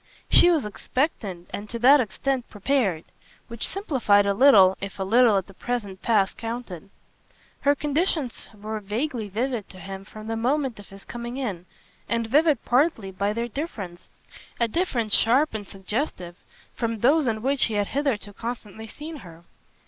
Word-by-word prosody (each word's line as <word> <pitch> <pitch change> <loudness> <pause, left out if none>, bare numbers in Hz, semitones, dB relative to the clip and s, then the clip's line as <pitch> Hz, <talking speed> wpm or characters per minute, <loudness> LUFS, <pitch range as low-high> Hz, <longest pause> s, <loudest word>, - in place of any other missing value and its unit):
She 350 - +7
was 315 -9 +2
expectant 210 - -3
and 205 +1 -6
to 235 - -4
that 265 +4 +6
extent 250 +3 -2
prepared; 205 - 0 0.5
which 235 -1 -3
simplified 250 - +2
a 200 - +2
little 200 -6 +7
if 195 0 -6
a 195 - -2
little, 225 +1 +5
at 190 - -1
the 195 - -15
present 205 -3 -4
pass, 205 -4 +2
counted. 225 -6 -6 0.7
Her 285 0 +3
conditions 295 -2 -1
were 215 0 -6
vaguely 220 +2 -3
vivid 230 +1 -2
to 185 - -11
him 195 0 -7
from 215 +1 -11
the 225 0 -3
moment 255 +1 0
of 205 - -13
his 195 0 -13
coming 240 +1 -6
in, 195 -10 -4 0.4
and 230 0 0
vivid 290 +2 +3
partly 245 - +2
by 200 +2 -1
their 230 +2 -2
difference, 210 - -6 0.5
a 235 - +3
difference 235 - -1
sharp 260 +6 +3
and 210 -2 -5
suggestive, 190 - -4 0.4
from 230 -2 -3
those 285 +3 +4
in 220 -1 -1
which 275 +1 +3
he 220 - -2
had 205 -1 0
hitherto 260 -8 -1
constantly 225 -1 -6
seen 305 +7 -8
her. 170 - -13
225 Hz, 165 wpm, -25 LUFS, 200-265 Hz, 0.7 s, She